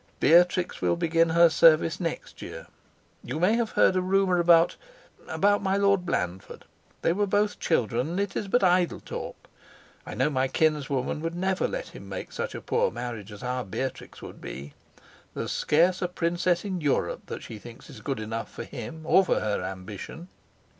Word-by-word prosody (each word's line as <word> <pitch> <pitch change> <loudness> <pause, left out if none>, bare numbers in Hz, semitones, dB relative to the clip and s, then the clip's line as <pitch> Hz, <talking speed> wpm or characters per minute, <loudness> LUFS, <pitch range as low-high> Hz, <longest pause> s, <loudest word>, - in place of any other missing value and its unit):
Beatrix 175 +2 +4
will - - +2
begin 165 -1 +2
her 170 +1 +6
service 165 +1 +4
next 165 -3 -5
year. - - -8 0.6
You 155 - -4
may 185 +6 +3
have 230 -1 0
heard - - +4
a 185 - +2
rumor 185 -1 +2
about 170 -1 +5 0.5
about 205 +1 +2
my 195 0 +1
Lord 200 -2 +2
Blandford. 90 - -3 0.4
They 165 - +3
were 205 +2 0
both 205 +1 +1
children; 125 - 0
and 175 +3 -2
it 200 -1 -2
is 205 - -2
but 245 +4 +2
idle 180 -1 +3
talk. - - -6 0.7
I - - -8
know 150 - +1
my 130 -1 +1
kinswoman 145 -2 0
would 165 +1 -3
never 190 +2 0
let - - -5
him - - -11
make - - -6
such - - -4
a - - -6
poor 480 +1 +1
marriage 115 - -6
as 105 - -10
our 125 0 -2
Beatrix 120 +6 -5
would - - -10
be. 70 +2 -8 0.6
There's - - -3
scarce 175 +4 +2
a 180 - +1
princess 175 +1 0
in 185 -3 -3
Europe 145 -2 -1
that - - -6
she 110 - -8
thinks 115 +2 -12
is - - -12
good 135 -5 -3
enough 115 +1 -5
for - - -7
him 160 0 -8
or 190 +4 +5
for - - +1
her 105 -1 -1
ambition." 100 - -7
170 Hz, 185 wpm, -27 LUFS, 130-185 Hz, 0.7 s, her